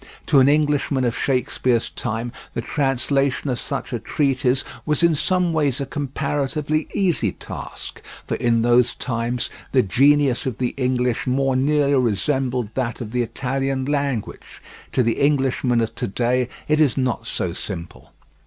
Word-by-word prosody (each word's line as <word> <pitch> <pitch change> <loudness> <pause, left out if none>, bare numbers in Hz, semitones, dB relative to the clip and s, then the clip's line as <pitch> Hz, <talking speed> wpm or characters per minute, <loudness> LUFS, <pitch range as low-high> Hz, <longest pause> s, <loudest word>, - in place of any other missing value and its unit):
To 145 - +5
an 130 +1 +6
Englishman 145 -2 +2
of 120 -1 0
Shakespeare's 125 -2 0
time 115 0 -3 0.2
the - - -1
translation 135 +1 0
of 120 - -2
such - - -4
a 120 - -1
treatise 130 +1 +1 0.2
was 150 +3 0
in 170 -1 +5
some 180 +3 +1
ways 145 -5 +2
a 140 - -2
comparatively 145 +2 -2
easy 170 - +1
task, - - -8 0.2
for - - -3
in 115 -1 +2
those 120 0 +3
times 120 -1 -2 0.2
the 130 -2 +5
genius 135 +5 +3
of 125 - -3
the 125 -1 0
English 125 -2 0
more 135 +1 +1
nearly 145 +1 +2
resembled 125 0 0
that 120 -2 -2
of 115 -4 -6
the 125 0 0
Italian 130 +3 -2
language; 140 -5 -3 0.3
to 130 - +2
the 115 -1 0
Englishman 135 -4 +2
of 115 - -2
to - - -3
day 125 +4 0 0.2
it 155 0 +2
is 145 -5 +3
not 130 -3 -1
so - - -2
simple. 85 +1 -7
130 Hz, 155 wpm, -22 LUFS, 120-140 Hz, 0.3 s, an